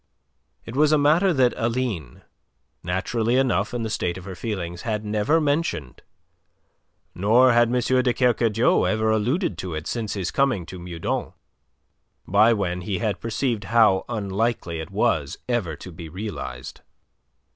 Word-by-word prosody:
It 115 Hz, -, -8 dB
was 150 Hz, +2 st, +4 dB
a 155 Hz, -, +5 dB
matter 160 Hz, +7 st, +4 dB
that 130 Hz, -6 st, +3 dB
Aline 115 Hz, -, -3 dB, 0.6 s
naturally 110 Hz, +6 st, -1 dB
enough 130 Hz, -2 st, +1 dB
in 120 Hz, -1 st, -3 dB
the 110 Hz, -, -3 dB
state 90 Hz, -4 st, -2 dB
of 90 Hz, -, -10 dB
her 95 Hz, -, -6 dB
feelings 90 Hz, -3 st, -5 dB
had 110 Hz, -2 st, -3 dB
never 105 Hz, +10 st, +2 dB
mentioned, 145 Hz, -, -1 dB, 1.1 s
nor 120 Hz, +7 st, +4 dB
had 120 Hz, 0 st, +5 dB
M. 120 Hz, -, -3 dB
de 125 Hz, 0 st, +2 dB
Kercadiou 120 Hz, -2 st, +2 dB
ever 110 Hz, 0 st, +1 dB
alluded 110 Hz, -, 0 dB
to 90 Hz, -4 st, -4 dB
it 80 Hz, +1 st, -5 dB
since 110 Hz, -4 st, -3 dB
his 95 Hz, -3 st, -2 dB
coming 130 Hz, -10 st, +1 dB
to 90 Hz, +2 st, -9 dB
Meudon, 85 Hz, -1 st, -4 dB, 0.9 s
by 105 Hz, +5 st, +5 dB
when 90 Hz, -5 st, -1 dB
he 95 Hz, +1 st, -2 dB
had 105 Hz, -1 st, -2 dB
perceived 115 Hz, -1 st, -2 dB
how 110 Hz, -5 st, +4 dB
unlikely 105 Hz, -5 st, -2 dB
it 80 Hz, -, -6 dB
was 70 Hz, -3 st, 0 dB
ever 115 Hz, -11 st, -1 dB
to 90 Hz, -, -10 dB
be 80 Hz, -1 st, -9 dB
realized. 80 Hz, -, -7 dB
110 Hz, 150 wpm, -24 LUFS, 90-120 Hz, 1.1 s, a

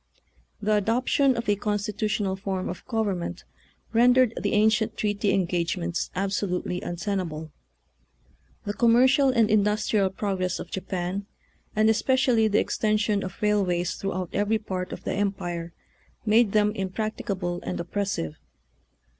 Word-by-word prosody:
The 215 Hz, 0 st, +1 dB
adoption 250 Hz, +5 st, +2 dB
of 235 Hz, -, -3 dB
a 205 Hz, -, +3 dB
constitutional 205 Hz, -1 st, -1 dB
form 190 Hz, -1 st, -3 dB
of 180 Hz, -, -6 dB
government 195 Hz, -7 st, -2 dB, 0.5 s
rendered 245 Hz, 0 st, +5 dB
the -, -, -1 dB
ancient 215 Hz, +1 st, +2 dB
treaty 205 Hz, -1 st, 0 dB
engagements 175 Hz, -2 st, -1 dB
absolutely 190 Hz, -2 st, -1 dB
untenable. 175 Hz, -4 st, -3 dB, 1.1 s
The 205 Hz, -, -2 dB
commercial 255 Hz, +5 st, +4 dB
and 230 Hz, -4 st, +3 dB
industrial 210 Hz, -1 st, +2 dB
progress 190 Hz, -2 st, -2 dB
of -, -, -8 dB
Japan, 190 Hz, +1 st, -3 dB, 0.5 s
and 215 Hz, +1 st, +4 dB
especially 235 Hz, 0 st, +3 dB
the 210 Hz, 0 st, +2 dB
extension 210 Hz, -1 st, +1 dB
of 185 Hz, +2 st, -7 dB
railways 185 Hz, -4 st, +1 dB
throughout 185 Hz, -3 st, -4 dB
every 205 Hz, +2 st, +1 dB
part 185 Hz, -4 st, -4 dB
of -, -, -7 dB
the -, -, -2 dB
Empire, 175 Hz, -4 st, -2 dB, 0.5 s
made 220 Hz, -1 st, +4 dB
them 210 Hz, -1 st, +4 dB
impracticable 190 Hz, -3 st, -3 dB
and -, -, -4 dB
op 170 Hz, -, -6 dB
pressive. 195 Hz, -, -2 dB
205 Hz, 125 wpm, -26 LUFS, 185-215 Hz, 1.1 s, rendered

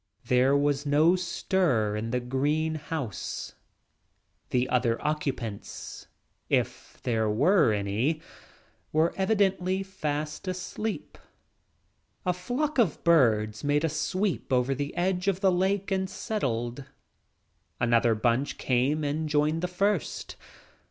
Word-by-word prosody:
Their 130 Hz, +3 st, +4 dB
was 145 Hz, 0 st, +1 dB
no 155 Hz, +4 st, +4 dB
stir 170 Hz, -, 0 dB
in 110 Hz, +2 st, -3 dB
the 125 Hz, +2 st, 0 dB
green; 150 Hz, +5 st, -1 dB, 1.7 s
The 125 Hz, 0 st, +1 dB
other 120 Hz, -2 st, +1 dB
occupants, 135 Hz, -8 st, -4 dB, 0.4 s
if -, -, -1 dB
there 110 Hz, -3 st, +1 dB
were 145 Hz, -, +4 dB
any, 105 Hz, +10 st, 0 dB, 0.7 s
were 160 Hz, +2 st, +2 dB
evidently 190 Hz, -2 st, +1 dB
fast 150 Hz, -3 st, -4 dB
asleep. 185 Hz, +4 st, -4 dB
s -, -, -28 dB, 1.0 s
A 180 Hz, -, +2 dB
flock 255 Hz, -, -2 dB
of 200 Hz, -11 st, +2 dB
birds 110 Hz, -10 st, +3 dB
made 145 Hz, +1 st, +2 dB
a 165 Hz, -, +2 dB
sweep 185 Hz, +4 st, -1 dB
over 130 Hz, +1 st, +2 dB
the 140 Hz, +1 st, -4 dB
edge 180 Hz, +1 st, 0 dB
of 195 Hz, -2 st, +2 dB
the 190 Hz, -2 st, +4 dB
lake 190 Hz, +2 st, 0 dB
and 190 Hz, -1 st, 0 dB
settled. 130 Hz, -, -2 dB, 1.0 s
Another 120 Hz, -1 st, +3 dB
bunch 120 Hz, +5 st, 0 dB
came 135 Hz, +5 st, +1 dB
and 150 Hz, +2 st, -1 dB
joined 150 Hz, +2 st, +2 dB
the 180 Hz, -, 0 dB
first. 195 Hz, 0 st, -1 dB
150 Hz, 120 wpm, -28 LUFS, 125-185 Hz, 1.7 s, Their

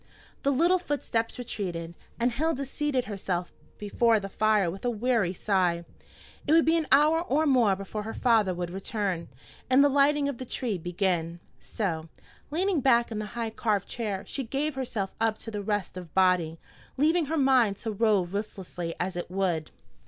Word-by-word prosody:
The 280 Hz, -, +1 dB
little 340 Hz, +7 st, +3 dB
footsteps 250 Hz, -8 st, -2 dB
retreated, 180 Hz, -9 st, -4 dB, 0.3 s
and 240 Hz, +1 st, +2 dB
Hilda 280 Hz, +1 st, -1 dB
seated 275 Hz, -2 st, -1 dB
herself 185 Hz, -4 st, -3 dB, 0.2 s
before 220 Hz, +2 st, +2 dB
the 195 Hz, -1 st, -6 dB
fire 215 Hz, -2 st, +2 dB
with 195 Hz, +2 st, -9 dB
a 245 Hz, -, +1 dB
weary 230 Hz, -4 st, +1 dB
sigh. 180 Hz, -3 st, 0 dB, 0.6 s
It 300 Hz, -, +4 dB
would 325 Hz, 0 st, +6 dB
be 325 Hz, +1 st, +4 dB
an 320 Hz, -3 st, 0 dB
hour 305 Hz, +4 st, +5 dB
or 310 Hz, -2 st, +1 dB
more 245 Hz, -9 st, +4 dB
before 195 Hz, +2 st, -5 dB
her 220 Hz, +2 st, -6 dB
father 225 Hz, -6 st, +3 dB
would 175 Hz, -1 st, -4 dB
return, 195 Hz, -2 st, -3 dB, 0.4 s
and 260 Hz, +2 st, +6 dB
the 285 Hz, -, +5 dB
lighting 285 Hz, +1 st, +3 dB
of 280 Hz, -4 st, -4 dB
the -, -, -4 dB
tree 230 Hz, -5 st, -2 dB
begin; 175 Hz, -1 st, -1 dB, 0.2 s
so, 165 Hz, -7 st, -3 dB, 0.4 s
leaning 360 Hz, +2 st, +1 dB
back 235 Hz, -3 st, +3 dB
in 215 Hz, -, -3 dB
the 215 Hz, -, -4 dB
high 230 Hz, -1 st, -2 dB
carved 215 Hz, -3 st, -1 dB
chair, 210 Hz, -5 st, -3 dB
she 275 Hz, -, -4 dB
gave 280 Hz, +6 st, -2 dB
herself 235 Hz, -7 st, -3 dB
up 225 Hz, -1 st, +2 dB
to 215 Hz, -2 st, -5 dB
rest 205 Hz, -3 st, -2 dB
of 180 Hz, -4 st, -8 dB
body, 180 Hz, -4 st, +3 dB, 0.4 s
leaving 320 Hz, +4 st, +3 dB
her 320 Hz, +3 st, -2 dB
mind 255 Hz, -8 st, +4 dB
to 225 Hz, -, -4 dB
rove 205 Hz, -4 st, +1 dB
listlessly 185 Hz, -4 st, -4 dB
as 185 Hz, +1 st, -2 dB
it 175 Hz, -, -4 dB
would. 180 Hz, -4 st, -1 dB
220 Hz, 175 wpm, -27 LUFS, 190-270 Hz, 0.6 s, would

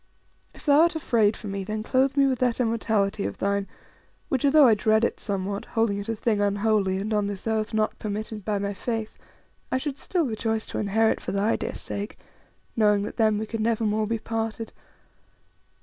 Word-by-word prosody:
If -, -, -14 dB
thou 290 Hz, -1 st, +5 dB
art 335 Hz, 0 st, +3 dB
afraid 225 Hz, -8 st, +2 dB
for -, -, -11 dB
me, 195 Hz, -1 st, -3 dB
then 215 Hz, +2 st, -4 dB
clothe 265 Hz, +3 st, +1 dB
me 280 Hz, -, +6 dB
with 260 Hz, -3 st, +1 dB
that 250 Hz, -1 st, +1 dB
immortality 220 Hz, -4 st, 0 dB
of -, -, -4 dB
thine, 200 Hz, 0 st, 0 dB, 0.6 s
which, 265 Hz, -, 0 dB
although 290 Hz, +1 st, +6 dB
I 235 Hz, -, +7 dB
dread 220 Hz, +1 st, +2 dB
it -, -, 0 dB
somewhat, 200 Hz, 0 st, -3 dB
holding 225 Hz, -3 st, 0 dB
it 205 Hz, +2 st, -6 dB
a 225 Hz, -, 0 dB
thing 215 Hz, -1 st, 0 dB
unholy, 205 Hz, -1 st, +1 dB
and, 210 Hz, +3 st, -2 dB
on 210 Hz, -1 st, +1 dB
this 200 Hz, -2 st, -6 dB
earth, 220 Hz, -1 st, 0 dB
not 215 Hz, 0 st, 0 dB
permitted 215 Hz, 0 st, -4 dB
by 210 Hz, 0 st, -1 dB
my 200 Hz, 0 st, -2 dB
Faith, 220 Hz, +2 st, -4 dB, 0.5 s
I -, -, +2 dB
should 280 Hz, +1 st, -4 dB
still 350 Hz, -4 st, 0 dB
rejoice 220 Hz, -2 st, -2 dB
to -, -, -3 dB
inherit 220 Hz, +2 st, +2 dB
for -, -, -4 dB
thy 200 Hz, +3 st, +2 dB
dear -, -, -4 dB
sake, 205 Hz, +3 st, -5 dB, 0.6 s
knowing 210 Hz, -2 st, +3 dB
that 210 Hz, -, -6 dB
then 215 Hz, -2 st, +3 dB
we 215 Hz, -, -2 dB
could 225 Hz, +1 st, -5 dB
never 225 Hz, 0 st, +1 dB
more 215 Hz, 0 st, +1 dB
be 230 Hz, +1 st, 0 dB
parted. 225 Hz, 0 st, -4 dB
220 Hz, 200 wpm, -25 LUFS, 205-230 Hz, 0.6 s, I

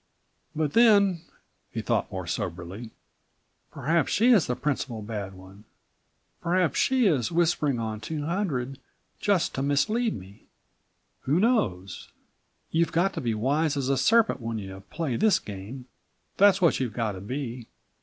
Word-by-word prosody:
"But 150 Hz, -2 st, -1 dB
then," 200 Hz, -7 st, +5 dB, 0.5 s
he -, -, -5 dB
thought -, -, 0 dB
more 95 Hz, -2 st, -5 dB
soberly, 90 Hz, +4 st, -5 dB, 0.8 s
"perhaps 165 Hz, +5 st, 0 dB
she 235 Hz, +4 st, +4 dB
is 205 Hz, -10 st, +5 dB
the 125 Hz, -, -1 dB
principal 125 Hz, -5 st, -3 dB
bad 100 Hz, -3 st, -5 dB
one. 95 Hz, +2 st, -14 dB, 0.8 s
Perhaps 175 Hz, -3 st, +1 dB
she 260 Hz, -2 st, +3 dB
is 145 Hz, -, +2 dB
whispering 165 Hz, -5 st, +1 dB
on 110 Hz, -2 st, -3 dB
200 150 Hz, -, -3 dB, 0.4 s
just 195 Hz, -4 st, +1 dB
to 135 Hz, -, -2 dB
mislead 210 Hz, -, +1 dB
me. 95 Hz, +1 st, -14 dB, 0.8 s
Who 145 Hz, +6 st, +2 dB
knows? 105 Hz, -, 0 dB, 0.6 s
You've 165 Hz, +1 st, +1 dB
got 190 Hz, +4 st, +1 dB
to -, -, -4 dB
be 115 Hz, -3 st, -1 dB
wise 145 Hz, +6 st, 0 dB
as 135 Hz, -1 st, -1 dB
a 140 Hz, -, +3 dB
serpent 220 Hz, -, +3 dB
when 115 Hz, 0 st, -3 dB
you 95 Hz, -2 st, -7 dB
play 150 Hz, -8 st, -2 dB
this 215 Hz, -4 st, +4 dB
game, 105 Hz, -, -8 dB, 0.5 s
that's 195 Hz, -1 st, +5 dB
what 170 Hz, -, +4 dB
you've 125 Hz, -4 st, -2 dB
got 115 Hz, -3 st, -1 dB
to 95 Hz, -2 st, -8 dB
be. 125 Hz, +1 st, -5 dB
140 Hz, 145 wpm, -26 LUFS, 110-175 Hz, 0.8 s, then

